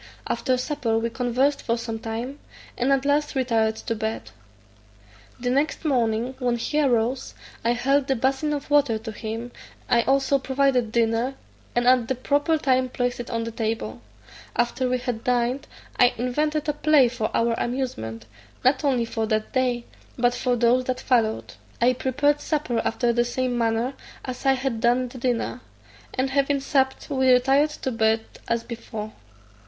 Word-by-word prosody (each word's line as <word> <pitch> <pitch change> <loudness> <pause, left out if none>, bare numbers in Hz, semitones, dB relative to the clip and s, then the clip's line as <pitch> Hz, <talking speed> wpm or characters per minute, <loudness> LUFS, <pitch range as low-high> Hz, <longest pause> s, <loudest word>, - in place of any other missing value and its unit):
After 255 -2 0
supper 250 -4 -1
we 230 +1 -1
conversed 250 +4 +1
for 230 0 0
some 225 -1 -4
time; 230 +6 -5 0.4
and 255 +3 +1
at 275 0 +2
last 295 +1 +1
retired 225 -4 +1
to 230 - -3
bed. 220 - -4 1.1
The 245 0 -1
next 290 +5 0
morning, 240 -3 +1
when 245 -2 +1
he 300 +6 0
arose, 250 -1 0 0.3
I 235 +1 +3
held 275 +3 +1
the 270 - +2
basin 265 +5 0
of 290 0 -4
water 285 -6 +4
to 220 +1 -7
him; 225 +2 -5 0.4
I 235 - +4
also 275 +2 +2
provided 265 -3 +1
dinner, 230 +3 +1 0.4
and 240 0 +2
at 250 -2 +5
the 260 - 0
proper 290 +5 +1
time 260 -3 +2
placed 245 0 -2
it 240 - -6
on 230 -1 -1
the 230 - -4
table: 220 - -3 0.5
after 240 +2 0
we 255 - +1
had 245 -3 -4
dined 250 +2 0 0.3
I 245 -1 +5
invented 300 +5 -1
a 295 - +1
play 300 -3 +4
for 230 -2 -2
our 230 0 +2
amusement, 115 - -3 0.4
not 260 +3 +3
only 255 -5 +2
for 225 -1 -2
that 215 0 -1
day, 250 -2 +1 0.3
but 245 0 +3
for 250 0 0
those 240 +2 +3
that 255 0 -2
followed. 230 -5 +1 0.3
I 245 +1 +4
prepared 285 +4 +1
supper 290 -7 -1
after 235 +1 +1
the 240 0 +3
same 250 +1 -1
manner 230 +2 0 0.3
as 255 +1 -4
I 270 - +6
had 260 -4 -2
done 245 +1 +2
the 255 - -10
dinner; 245 0 -1 0.5
and 265 +1 0
having 280 0 +2
supped, 270 -1 0
we 260 -2 +3
retired 270 +4 +4
to 260 - -1
bed 220 -1 +2 0.3
as 235 0 0
before. 220 -2 -7
250 Hz, 170 wpm, -24 LUFS, 230-270 Hz, 1.1 s, I